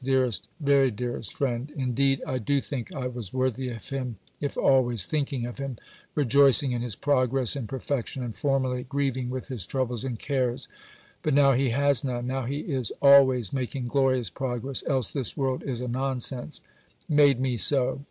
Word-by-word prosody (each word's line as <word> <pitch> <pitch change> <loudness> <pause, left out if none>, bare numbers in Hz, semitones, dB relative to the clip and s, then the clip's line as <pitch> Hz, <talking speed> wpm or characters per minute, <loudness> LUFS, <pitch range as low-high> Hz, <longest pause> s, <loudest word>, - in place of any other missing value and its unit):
DEAREST 130 -6 +1
VERY 140 -3 +4
DEAREST 120 -2 -4
FRIEND 130 0 -2
Indeed 135 0 +1
I 130 - -2
do 140 +5 +1
think 130 -3 -5
I 135 -3 -4
was 120 -6 -5
worthy 130 0 -1
of 115 -3 -8
him 130 -5 -4 0.2
if 145 -1 -3
always 120 -7 +3
thinking 140 -5 -1
of 120 +2 -7
him, 135 -3 -4 0.4
rejoicing 140 0 +4
in 120 -1 -2
his 120 -4 -4
progress 130 -2 +1
in 130 -6 -4
perfection 135 0 -3
and 115 -4 -5
(formerly) 130 +1 0
grieving 130 -1 -2
with 130 +2 -5
his 125 -8 -2
troubles 125 +1 -2
and 125 -3 -3
cares 130 -2 -1 0.5
(but 150 -3 +1
now 140 -1 +6
he 130 0 +2
has 140 +1 +2
none, 125 -3 -2
now 130 0 -2
he 140 +4 -3
is 130 - -2
always 130 -6 +6
making 130 -1 -3
glorious 130 -6 +2
progress, 130 +5 -3
else 130 -6 +1
this 135 -1 -2
world 135 -2 -1
is 125 -3 -4
a 125 - -3
nonsense), 130 0 -2 0.5
made 145 -4 +4
me 130 -1 0
so. 125 +6 +3
130 Hz, 175 wpm, -26 LUFS, 120-140 Hz, 0.5 s, now